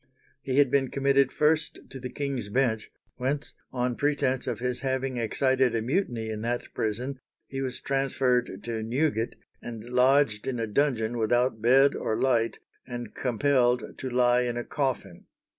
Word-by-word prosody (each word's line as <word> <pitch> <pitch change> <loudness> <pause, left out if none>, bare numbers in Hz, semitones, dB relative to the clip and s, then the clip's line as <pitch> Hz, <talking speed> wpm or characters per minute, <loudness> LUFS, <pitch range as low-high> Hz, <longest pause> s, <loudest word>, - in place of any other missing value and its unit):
He 135 -1 -2
had 140 -3 +5
been 135 -2 +2
committed 140 -1 +2
first 155 +1 +1
to 135 - -7
the 125 0 -5
King's 135 -7 -3
Bench, 110 -2 0 0.3
whence, 140 +4 -2 0.2
on 125 -1 -1
pretence 140 -2 0
of - - -1
his 125 0 -2
having 130 -1 -2
excited 130 +1 +2
a 115 - +1
mutiny 120 - -1
in 110 -1 -4
that 120 +2 -3
prison, 125 +5 -2 0.3
he 135 0 -5
was 130 -2 -3
transferred 135 -2 0
to 115 -2 -3
Newgate, 120 0 0 0.3
and 115 -2 -7
lodged 125 -2 +3
in 125 -3 -2
a 115 - 0
dungeon 120 -1 0
without 120 +1 +1
bed 135 +4 +5
or 110 - -2
light, 120 -3 +2 0.3
and 120 -3 -6
compelled 125 -1 +1
to 130 - -3
lie 125 0 +3
in 120 -1 -2
a 120 - -2
coffin. 130 - -3
125 Hz, 160 wpm, -27 LUFS, 120-135 Hz, 0.3 s, had